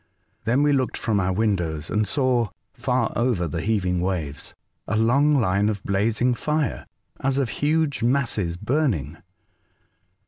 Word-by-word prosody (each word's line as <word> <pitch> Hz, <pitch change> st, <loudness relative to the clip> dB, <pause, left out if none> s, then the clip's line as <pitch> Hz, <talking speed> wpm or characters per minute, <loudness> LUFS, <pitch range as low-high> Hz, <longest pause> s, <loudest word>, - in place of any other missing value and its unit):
Then 125 Hz, +6 st, +2 dB
we 145 Hz, 0 st, +3 dB
looked 130 Hz, -2 st, 0 dB
from 110 Hz, -3 st, 0 dB
our 95 Hz, -1 st, +1 dB
windows 90 Hz, -7 st, -1 dB
and 105 Hz, 0 st, +1 dB
saw, 125 Hz, -6 st, +1 dB, 0.2 s
far 125 Hz, -3 st, 0 dB
over 120 Hz, -8 st, +1 dB
tlie 80 Hz, +2 st, -3 dB
heaving 95 Hz, -4 st, 0 dB
waves, 85 Hz, -6 st, -3 dB, 0.3 s
a 105 Hz, -, 0 dB
long 140 Hz, +7 st, +3 dB
line 105 Hz, -4 st, +2 dB
of 105 Hz, -3 st, -3 dB
blazing 110 Hz, +5 st, +1 dB
fire, 150 Hz, +3 st, -2 dB, 0.3 s
as 135 Hz, 0 st, 0 dB
of 135 Hz, -4 st, +1 dB
huge 150 Hz, +3 st, 0 dB
masses 115 Hz, -9 st, 0 dB
burning. 100 Hz, -, -1 dB
110 Hz, 140 wpm, -24 LUFS, 95-130 Hz, 0.3 s, we